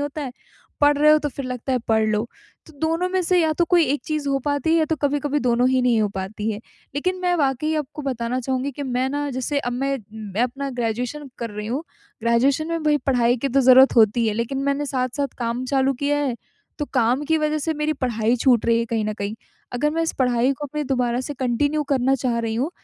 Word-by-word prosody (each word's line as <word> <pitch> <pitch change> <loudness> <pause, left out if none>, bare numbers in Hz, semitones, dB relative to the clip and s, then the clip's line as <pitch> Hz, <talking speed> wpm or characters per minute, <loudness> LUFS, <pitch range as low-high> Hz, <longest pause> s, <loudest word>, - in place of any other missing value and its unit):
होता 290 +1 -3
है, 260 -3 -5 0.5
पढ़ 290 0 +5
रहे 300 +1 +6
हो 305 - +6
तो - - +2
फिर 275 0 -6
लगता 255 +1 -4
है 255 - +2
पढ़ 220 -1 +3
लो, 215 +1 0 0.4
तो 320 - -15
दोनों 330 +3 0
में 375 0 0
से 360 +1 +2
या 315 -1 +2
तो 345 +3 +1
कोई 345 -1 +4
एक 285 +2 0
चीज़ 305 -2 -2
हो 275 0 +1
पाती 285 +2 0
है 330 - +4
या 315 - +3
तो 315 0 -1
कभी-कभी 290 0 0
दोनों 245 0 +2
ही 260 -1 +2
नहीं 240 -3 +3
हो 210 - +1
पाती 210 +3 -3
है। 210 - -4 0.4
लेक़िन 365 +6 -1
मैं 355 -1 +2
वाकई 290 +1 0
आपको 300 0 -4
बताना 250 -1 -2
चाहूँगी 260 +2 -2
कि 285 - -6
मैं 255 0 -1
ना 290 +1 -2
जैसे 260 +3 -1
अब 245 -3 -3
मैं 275 +2 -1 0.2
मैं 215 0 -3
अपना 275 +3 -2
ग्रेजुएशन 245 +4 -3
कर 230 -2 -4
रही 210 0 -6
हूँ, 260 +8 -2 0.4
ग्रेजुएशन 260 +7 +2
में 330 -1 -2
भई 300 -1 +3
पढ़ाई 245 -2 +3
की 275 +3 -2
तो 275 +2 +2
ज़रूरत 260 0 +6
होती 225 +1 +4
है, 210 - -1
लेक़िन 235 +4 -2
मैंने 280 +1 0
साथ-साथ 265 +1 -1
काम 240 +1 -2
चालू 270 0 +2
किया 290 +1 +2
है, 275 -4 0 0.4
तो 295 - -1
काम 245 +3 +2
की 320 +1 +2
वज़ह 305 0 0
से 320 +2 -1
मेरी 300 +1 0
पढ़ाई 240 -4 0
छूट 245 -2 +3
रही 230 0 +4
है 230 - 0
कहीं 225 -2 -1
न 215 - -1
कहीं। 200 +1 -4 0.4
अगर 290 +5 +1
मैं 330 +1 -1
इस 325 - -1
पढ़ाई 250 0 +2
को 290 +2 -6
अपने 300 +2 -4
दोबारा 250 -2 0
से 285 +2 -5
कंटिन्यू 285 +4 0
करना 265 0 +3
चाह 245 -2 -1
रही 225 -1 -2
हूँ, 265 +9 -1
265 Hz, 240 wpm, -22 LUFS, 240-290 Hz, 0.5 s, रहे